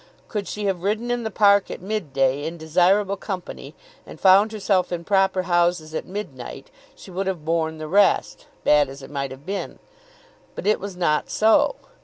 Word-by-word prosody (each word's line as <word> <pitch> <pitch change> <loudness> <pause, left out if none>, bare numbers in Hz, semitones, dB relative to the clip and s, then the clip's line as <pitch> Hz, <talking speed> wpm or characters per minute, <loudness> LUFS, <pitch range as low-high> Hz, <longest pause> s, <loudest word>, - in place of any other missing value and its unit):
Could 205 -2 -4
she 210 0 -4
have 190 -3 -1
ridden 215 +5 -1
in 245 0 -1
the 220 - -3
park 200 -1 +4
at - - -6
mid 195 -5 -4
day 135 +1 +1
in 165 +2 -5
desirable 185 +5 +2
company, 185 -3 -7 0.3
and - - -12
found 195 +3 +5
herself 195 -4 0
in 170 -1 -3
proper 190 -1 +2
houses 175 -3 +1
at - - -4
midnight, 180 -11 -7 0.2
she - - -13
would 190 +2 -3
have 175 -5 -3
borne 160 -1 0
the 155 0 -6
rest, 200 +4 +2 0.2
bad 145 -2 +4
as 135 0 -10
it 135 - -11
might 140 -1 -3
have 135 +2 -11
been. 195 +2 -4 0.8
But - - -6
it 210 +1 +3
was 195 -2 -7
not 150 -4 +1
so. 220 - +3
185 Hz, 190 wpm, -23 LUFS, 160-200 Hz, 0.8 s, found